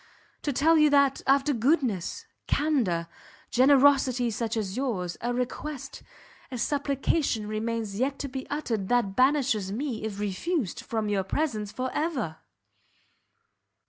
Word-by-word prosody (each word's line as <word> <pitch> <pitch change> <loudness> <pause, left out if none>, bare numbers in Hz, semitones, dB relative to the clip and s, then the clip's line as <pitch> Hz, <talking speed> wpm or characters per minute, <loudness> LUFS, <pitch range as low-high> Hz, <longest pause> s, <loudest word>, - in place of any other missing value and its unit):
to 290 - -1
tell 315 +5 +4
you 305 0 +6
that, 280 -1 +3
after 275 +2 +3
goodness, 255 - 0 0.2
candour, 235 - +1 0.4
generosity 260 -2 +4
such 225 +1 -2
as 200 -3 -2
yours, 215 -10 -2
a 240 - -1
request, 265 +2 -4 0.5
a 255 - -5
supplication 275 -3 0
remains 215 -1 -3
yet 275 +2 0
to 280 - -4
be 265 0 -6
uttered 230 -10 -2
that 235 -5 +1
banishes 255 -7 +2
me, 240 0 -3
if 210 -2 -4
refused, 210 - -2
from 220 -2 -3
your 205 -2 +1
presence 215 -3 -2
for 255 +4 -3
ever!" 265 - -2
250 Hz, 130 wpm, -27 LUFS, 215-280 Hz, 0.5 s, you